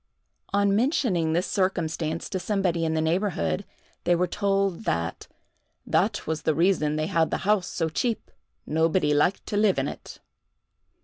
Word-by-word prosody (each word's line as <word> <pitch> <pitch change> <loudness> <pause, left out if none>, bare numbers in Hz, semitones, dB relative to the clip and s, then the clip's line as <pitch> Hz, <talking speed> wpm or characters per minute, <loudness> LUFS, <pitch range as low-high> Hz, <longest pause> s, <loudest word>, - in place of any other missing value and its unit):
On 200 0 +3
mentioning 210 - +1
this 175 +3 +1
circumstance 165 -4 -1
to 190 - -2
somebody 180 -3 0
in 160 0 0
the 160 - +1
neighborhood, 160 - 0 0.4
they 175 0 +3
were 180 +1 +2
told 195 +1 0
that 85 0 -2 0.6
"that - - +1
was 160 0 -2
the 155 - +1
reason 160 -3 +2
they 155 0 0
had 165 0 +1
the - - -1
house 205 -3 +2
so 165 - -1
cheap: 225 +8 -2 0.3
nobody 160 0 +2
liked 165 +6 +1
to 205 - -2
live 210 -2 +3
in - - 0
it." - - -8
175 Hz, 160 wpm, -26 LUFS, 160-195 Hz, 0.6 s, On